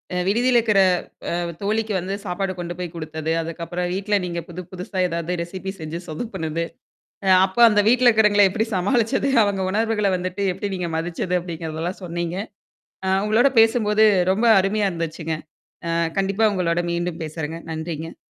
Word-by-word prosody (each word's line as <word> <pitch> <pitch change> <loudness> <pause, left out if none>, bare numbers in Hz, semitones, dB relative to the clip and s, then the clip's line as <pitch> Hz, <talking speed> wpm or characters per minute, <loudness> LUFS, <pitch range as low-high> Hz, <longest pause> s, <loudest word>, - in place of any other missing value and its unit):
அ - - 0
விடுதியில 240 +4 +3
இருக்கிற 210 -3 +2 0.6
அ - - -1 0.2
தோழிக்கு 215 +1 0
வந்து 190 +3 -3
சாப்பாடு 185 +1 -2
கொண்டு 175 0 -4
போய் 175 -2 -5
குடுத்தது. 160 -1 -4
அதுக்கப்புறம் 170 +2 -4
வீட்ல 205 +2 0
நீங்க 170 -1 -3
புது 175 +1 -7
புதுசா 185 +1 -6
ஏதாவது 170 +1 -2
ரெசிபி 185 +2 -6
செஞ்சு 160 +2 -5
சொதப்புனது. 160 -3 -3 0.6
அ - - +2 0.2
அப்போ 195 +5 -4
அந்த 210 -1 +3
வீட்ல 250 +1 +4
இருக்கவங்கள 210 -3 +5
எப்படி 220 +4 -1
சமாளிச்சது? 230 +7 +1
அவங்க 200 -1 -1
உணர்வுகள 210 -1 +1
வந்துட்டு 185 +2 -3
எப்படி 200 +1 -4
நீங்க 175 -2 -3
மதிச்சது 175 +2 -2
அப்படிங்கிறதெல்லாம் 165 +1 -5
சொன்னீங்க. 170 0 -3 0.7
ஆ - - 0 0.2
உங்களோட 225 +6 +4
பேசும்போது 220 -2 +4 0.3
ரொம்ப 225 +5 +1
அருமையா 200 +1 +1
இருந்துச்சுங்க. 165 -1 -3 0.5
அ - - -1 0.3
கண்டிப்பா 195 +3 +2
உங்களோட 175 -1 0
மீண்டும் 170 -1 -3
பேசுறேங்க. 160 +1 -5
நன்றிங்க. 160 0 -5
180 Hz, 150 wpm, -22 LUFS, 170-210 Hz, 0.7 s, இருக்கவங்கள